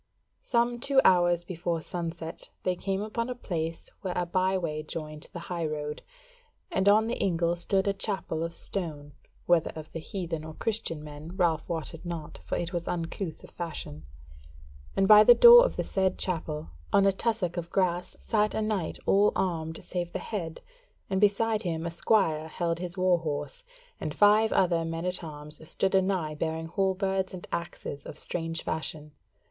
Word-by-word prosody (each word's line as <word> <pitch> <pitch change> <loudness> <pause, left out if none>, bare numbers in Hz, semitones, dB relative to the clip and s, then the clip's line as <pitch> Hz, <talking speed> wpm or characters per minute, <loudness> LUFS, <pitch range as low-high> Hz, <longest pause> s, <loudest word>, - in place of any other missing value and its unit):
Some 240 0 +1
two 275 +2 +4
hours 175 -1 +5
before 170 -1 -2
sunset 165 -1 -5
they 185 - +1
came 195 +2 -2
upon 230 +3 -3
a 250 - -3
place 165 -8 -4
where 185 -2 -3
a 180 - +1
byway 185 -3 0
joined 155 0 -6
the 175 - -7
high 170 -1 -3
road, 150 -1 -4 0.7
and 190 +1 +3
on 215 +2 +5
the 235 - -2
ingle 170 -2 +1
stood 190 +3 +1
a 200 - +3
chapel 195 -5 -2
of 165 0 -3
stone 150 -6 -5 0.3
(whether 175 -2 +3
of 155 -1 -8
the 165 - -5
heathen 165 -3 -4
or 160 0 -8
Christian 200 -9 -2
men 150 +4 -9
Ralph 170 -4 +1
wotted 165 -1 -4
not, 170 -3 -6
for 85 - -2
it 175 +1 -3
was 170 -1 -3
uncouth 165 0 -3
of - - -13
fashion), 155 -3 -6 0.9
and 195 - +4
by 210 0 +10
the 240 +2 +8
door 480 0 +10
of - - 0
the - - -1
said 190 -1 0
chapel, 155 - -3 0.2
on 200 0 +5
a 195 - +6
tussock 195 -3 -1
of 170 -1 -4
grass, 180 -2 0
sat 215 -2 +1
a - - 0
knight 210 -6 -1
all 205 +1 +5
armed 165 -3 -2
save 175 -1 -4
the - - -1
head, 170 -7 -5 0.5
and 190 +1 +1
beside 215 +1 +3
him 165 -4 -2
a 170 - -2
squire 165 -3 +2
held 170 0 -2
his 180 +1 -5
war 185 -1 +3
horse, 165 - -4 0.4
and - - -4
five 210 +2 +5
other 170 -3 +3
men 165 +1 -3
at 180 0 -1
arms 150 -1 -8
stood 190 0 0
anigh 185 -5 +1
bearing 160 +1 -3
halberds 190 +1 0
and 180 - -9
axes 170 -4 -5
of 150 - -9
strange 165 0 -4
fashion. 155 -1 -4
175 Hz, 175 wpm, -28 LUFS, 160-195 Hz, 0.9 s, by